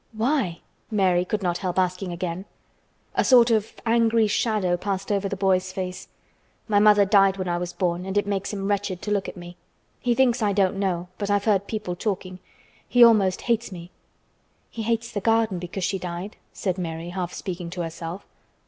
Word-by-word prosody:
"Why?" 220 - 0 0.3
Mary 190 -5 +2
could 200 +2 -3
not 175 -1 0
help 185 -2 -3
asking 185 0 0
again. 175 +1 -4 0.7
A - - +2
sort 245 -2 +6
of 220 -1 +1
angry 230 -1 +3
shadow 210 -4 +1
passed 195 +2 -3
over 200 -1 0
the 200 - -2
boy's 190 -1 +1
face. 185 -1 -5 0.6
"My 205 -2 +3
mother 205 -1 +6
died 195 -1 +4
when 185 -1 -3
I 175 0 0
was 175 0 -4
born 180 0 -2
and 190 +1 -2
it 205 - +2
makes 200 -1 -2
him 195 -2 -3
wretched 200 -3 -1
to 210 - -3
look 200 -2 0
at - - -11
me. 175 0 -10 0.4
He 240 -1 +1
thinks 250 -2 +3
I 205 -2 +2
don't 195 -1 +1
know, 180 -3 -1
but 205 -1 -2
I've 205 0 +1
heard 200 -3 +2
people 210 -5 -3
talking. 185 -2 -3 0.5
He 245 -1 +6
almost 205 -6 +5
hates 235 -2 0
me." 175 -1 -9 0.8
"He 230 - -5
hates 230 +1 -1
the 205 - -3
garden, 225 -4 +2
because 180 +2 -5
she 190 +1 0
died," 180 +3 -6 0.2
said 185 -2 -3
Mary 165 -1 -4
half 180 -1 -3
speaking 180 -3 -5
to 175 +1 -5
herself. 165 +2 -6
195 Hz, 195 wpm, -24 LUFS, 180-215 Hz, 0.8 s, sort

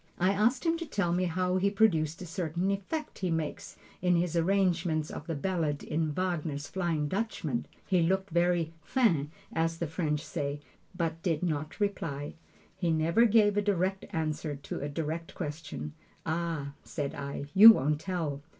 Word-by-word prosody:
I 185 +2 +3
asked 225 - +2
him 330 0 +2
to 335 - -4
tell 200 -10 0
me 180 +1 +1
how 180 +1 0
he 195 +2 +2
produced 175 -6 +2
a - - -6
certain 175 +2 -1
effect 245 +11 -4
he 185 - -1
makes 160 -2 -3 0.2
in 180 0 +3
his 175 -1 0
arrangement 170 -3 +1
of 145 - -7
the 165 - -2
ballad 155 -2 -1
in 155 0 -1
Wagner's 155 -4 -2
"Flying 170 -5 -1
Dutchman." 225 +5 -2 0.2
He 185 -3 +2
looked 190 +2 +1
very 170 -1 +2
"fin" 160 - +2 0.2
as 165 0 0
the 170 - -2
French 155 -1 -2
say, 140 0 -3 0.4
but 165 -1 -2
did 165 -2 0
not 155 -1 -2
reply. 160 -8 -2 0.4
He 175 - -1
never 165 +8 +3
gives 210 -2 +4
a - - +4
direct 195 -1 0
answer 155 -4 -2
to 140 - -6
a 145 - -3
direct 160 +2 -4
question. 145 - -5 0.3
"Ah," 160 -3 -2
said 145 -4 -4
I, 140 0 -5
"you 220 +4 +11
won't 150 -3 0
tell." 165 -7 -2
170 Hz, 170 wpm, -30 LUFS, 155-190 Hz, 0.4 s, you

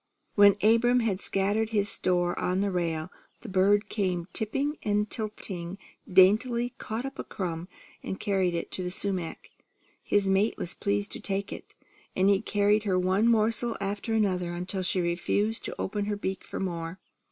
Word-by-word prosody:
When 205 -1 +7
Abram 240 +3 +4
had 200 -4 -1
scattered 205 +3 +1
his 205 -3 +1
store 175 -3 +1
on 185 +2 0
the 200 0 0
rail, 165 -1 -2 0.3
the 240 - -7
bird 200 +2 +3
came 180 -5 -1
tipping 275 +8 0
and 210 0 +1
tilting, 195 -5 -4 0.3
daintily 235 +6 +4
caught 225 +4 -4
up 270 - -7
a - - -2
crumb, 175 -2 -4 0.3
and 190 - -5
carried 190 -3 +1
it 170 - -4
to - - -1
the 180 - -2
sumac. 185 -2 -2 0.5
His 205 -1 +1
mate 195 +3 +2
was 175 - -2
pleased 205 0 -1
to - - -5
take 200 -2 -3
it; - - -11 0.4
and 190 +1 +3
he 195 - +2
carried 210 0 +2
her 195 -3 0
one 185 +5 +2
morsel 230 +1 +2
after 200 +3 -2
another 180 -5 0
until 180 +2 -3
she 185 0 +1
refused 190 +6 0
to - - -6
open 205 +1 -2
her 205 0 -2
beak 190 -1 -4
for - - -6
more. 170 -1 -4
200 Hz, 175 wpm, -28 LUFS, 185-215 Hz, 0.5 s, When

